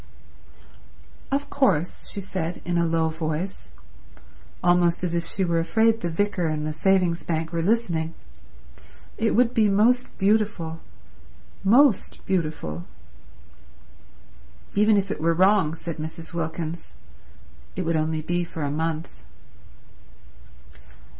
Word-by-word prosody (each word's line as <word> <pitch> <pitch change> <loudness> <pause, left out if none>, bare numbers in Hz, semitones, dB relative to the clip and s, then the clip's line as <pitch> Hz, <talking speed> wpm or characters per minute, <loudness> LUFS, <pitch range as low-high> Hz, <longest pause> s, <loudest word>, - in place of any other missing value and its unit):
"Of 280 +1 -1
course," 180 - +1
she 200 - -4
said 180 -3 -4
in 175 - -1
a 170 - +2
low 165 0 +1
voice, 160 - -4 0.9
almost 175 0 +3
as 175 -2 -1
if 170 -1 -1
she 190 +2 -1
were 170 -1 +1
afraid 225 +6 +2
the 175 - -1
vicar 180 0 0
and 155 -1 -2
the 155 - -2
Savings 180 -1 +2
Bank 160 0 -2
were 165 - 0
listening, 170 -5 0 1.0
"it 225 0 +2
would 245 +1 +3
be 220 -4 +3
most 235 +6 +2
beautiful—most 195 - 0
beautiful—" 155 - -2 1.9
"Even 210 +1 +4
if 195 0 0
it 185 - -4
were 165 +1 +2
wrong," 185 -3 +3
said 165 0 -6
Mrs. 160 +2 -7
Wilkins, 160 - -4 0.8
"it 185 - -2
would 165 -1 0
only 155 0 0
be 175 +2 0
for 165 -2 -6
a 140 - -1
month." 155 - -3
170 Hz, 120 wpm, -24 LUFS, 160-200 Hz, 1.9 s, Even